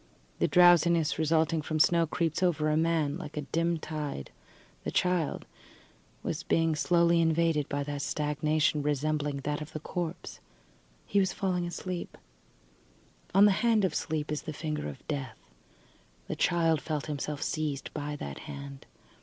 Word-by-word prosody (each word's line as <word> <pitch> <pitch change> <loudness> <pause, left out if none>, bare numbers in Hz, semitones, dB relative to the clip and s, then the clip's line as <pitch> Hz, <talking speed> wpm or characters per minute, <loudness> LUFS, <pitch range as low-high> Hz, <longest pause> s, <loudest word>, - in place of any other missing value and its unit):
The - - +3
drowsiness 170 -2 +5
resulting 160 0 +2
from 155 +1 -2
snow 170 +1 +4
creeps 165 +1 -1
over 155 -4 +2
a - - +2
man 160 -1 +1
like 155 -3 -8
a - - 0
dim 165 +4 0
tide. 150 - -5 0.5
The - - -2
child 180 -4 0 0.8
was - - -2
being 165 -1 +1
slowly 170 +1 +3
invaded 160 -2 +2
by 145 0 -1
a 145 0 -4
stagnation 150 +1 0
resembling 145 0 -1
that 145 +2 -2
of 150 +1 -8
the 155 - -4
corpse. 170 +2 -5 0.7
He 200 - +2
was 190 -1 +1
falling 180 -3 -1
asleep. 180 0 -5 1.2
On 200 +1 +8
the 205 - +6
hand 225 -4 +3
of 185 - -1
sleep 155 -1 -2
is 150 - -2
the 155 - -6
finger 150 - -3
of 70 - -11
death. 140 -3 -4 0.9
The - - -3
child 165 -3 +2
felt 155 -3 -3
himself 150 -1 -3
seized 150 -3 -3
by 145 0 -4
that 70 - -6
hand. 140 -1 -8
155 Hz, 155 wpm, -29 LUFS, 150-170 Hz, 1.2 s, On